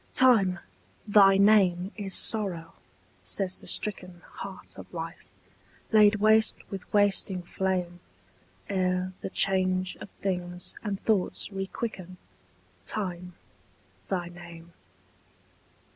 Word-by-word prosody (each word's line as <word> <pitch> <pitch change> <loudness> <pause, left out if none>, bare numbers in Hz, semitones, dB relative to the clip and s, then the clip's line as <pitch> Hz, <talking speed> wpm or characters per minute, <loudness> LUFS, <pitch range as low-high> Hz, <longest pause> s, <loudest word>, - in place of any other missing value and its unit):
TIME, 220 -8 +4 0.5
thy 195 -2 +6
name 195 -3 +4
is 195 -3 -3
sorrow, 185 -7 0 0.5
says 190 -2 -1
the - - -12
stricken 180 -4 -1
Heart 190 -2 -8
of - - -12
life, 165 0 -7 0.6
laid 215 -1 +6
waste 215 +1 +4 0.2
with 195 -2 -8
wasting 200 -2 +2
flame 180 -1 -2 0.7
Ere 185 -1 -1
the - - -4
change 185 -1 +1
of - - -10
things 180 -2 -3
and 200 -3 -3
thoughts 205 -4 0
requicken, 195 -1 -5 0.7
Time, 180 -3 -4 0.7
thy 180 -3 -2
name. 170 -1 -12
190 Hz, 100 wpm, -27 LUFS, 180-205 Hz, 0.7 s, thy